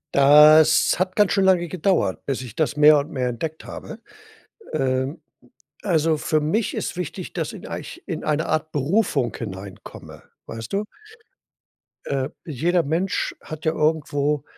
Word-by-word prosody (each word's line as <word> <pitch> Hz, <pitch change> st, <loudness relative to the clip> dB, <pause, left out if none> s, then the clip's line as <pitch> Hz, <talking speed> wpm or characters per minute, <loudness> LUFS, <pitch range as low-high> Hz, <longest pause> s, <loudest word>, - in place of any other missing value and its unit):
Das 150 Hz, +3 st, +6 dB
hat 185 Hz, 0 st, -1 dB
ganz 205 Hz, -5 st, +3 dB
schön 195 Hz, -, +2 dB
lange 180 Hz, -2 st, +3 dB
gedauert, 170 Hz, -, 0 dB
bis 135 Hz, -2 st, -2 dB
ich 120 Hz, -3 st, -10 dB
das 150 Hz, -3 st, -1 dB
mehr 150 Hz, 0 st, +7 dB
und 140 Hz, +2 st, -5 dB
mehr 125 Hz, -2 st, -1 dB
entdeckt 155 Hz, +6 st, -5 dB
habe. 220 Hz, -, -9 dB, 0.7 s
Ähm, 135 Hz, +2 st, -1 dB, 0.6 s
also 165 Hz, -4 st, +1 dB
für 155 Hz, +1 st, 0 dB
mich 195 Hz, +9 st, -1 dB
ist -, -, -4 dB
wichtig, 180 Hz, +1 st, -6 dB
dass -, -, -3 dB
in -, -, -10 dB
eich 345 Hz, -, -7 dB
in 165 Hz, -6 st, -5 dB
eine 155 Hz, +2 st, 0 dB
Art 155 Hz, 0 st, -1 dB
Berufung 145 Hz, -, 0 dB
hineinkomme, 95 Hz, -3 st, -9 dB, 0.2 s
weißt 115 Hz, 0 st, -8 dB
du? 200 Hz, +2 st, 0 dB, 1.2 s
Äh, 135 Hz, 0 st, -2 dB, 0.2 s
jeder 170 Hz, +4 st, 0 dB
Mensch 165 Hz, +6 st, -1 dB
hat 155 Hz, 0 st, -9 dB
ja 160 Hz, -, +3 dB
irgendwo 150 Hz, -2 st, 0 dB
155 Hz, 150 wpm, -22 LUFS, 140-175 Hz, 1.2 s, mehr